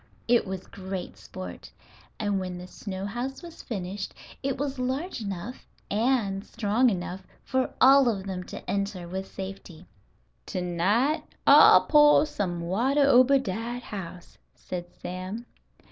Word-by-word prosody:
It 235 -3 +3
was 190 -1 -5
great 190 - -6
sport, 90 - -9 0.5
and 205 -2 0
when 185 -1 -4
the 180 - -8
snow 190 +1 -6
house 245 - -4
was 340 -1 -10
finished 195 -3 -5 0.3
it 275 -1 -1
was 275 -1 -3
large 260 +5 -2
enough 200 +4 -6 0.2
and 210 -3 +1
strong 230 +3 +1
enough 185 -1 -4 0.2
for 260 -1 0
all 270 -1 +7
of 195 -4 -3
them 185 -2 -4
to - - -9
enter 200 -3 -2
with 190 +2 -5
safety. 190 -3 -8 0.6
"To - - -3
night 205 - +1 0.2
I'll - - +9
poah 295 0 +6
some 180 - -3
water 240 +12 +2
ober 270 0 +6
dat 235 +1 -4
house," 180 -5 -8 0.2
said 175 -1 -6
Sam. 185 +6 -6
200 Hz, 140 wpm, -27 LUFS, 185-255 Hz, 0.6 s, I'll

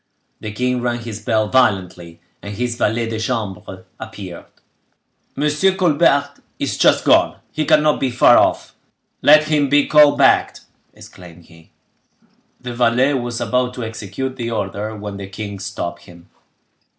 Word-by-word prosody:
The 105 - -6
king 125 +3 -2
rang 120 -1 -2
his 110 -2 -8
bell 110 -1 0
violently, 90 -8 0 0.2
and 100 0 -8
his 120 +2 -2
valet 115 0 -1
de 110 -1 -4
chambre 105 -5 -5
appeared. 90 -4 -9 0.9
"Monsieur 150 +7 +1
Colbert 145 -5 +1 0.2
is - - -3
just - - +2
gone; - - +3 0.2
he 155 - -2
cannot 150 -1 +3
be 135 - 0
far 120 0 +5
off. - - +1 0.5
Let 155 +1 +6
him 150 -2 0
be 145 0 +3
called 150 -1 +5
back!" - - +3 0.4
exclaimed 85 -2 -15
he. 80 -1 -20 0.9
The 125 -1 -7
valet 125 +3 +2
was 120 -2 -3
about 125 0 -1
to 125 - -5
execute 115 +4 -6
the 120 -2 -4
order, 105 0 -4
when 105 -1 -7
the 100 -1 -8
king 100 0 -7
stopped 85 -4 -6
him. 85 -1 -16
115 Hz, 150 wpm, -18 LUFS, 100-135 Hz, 0.9 s, Let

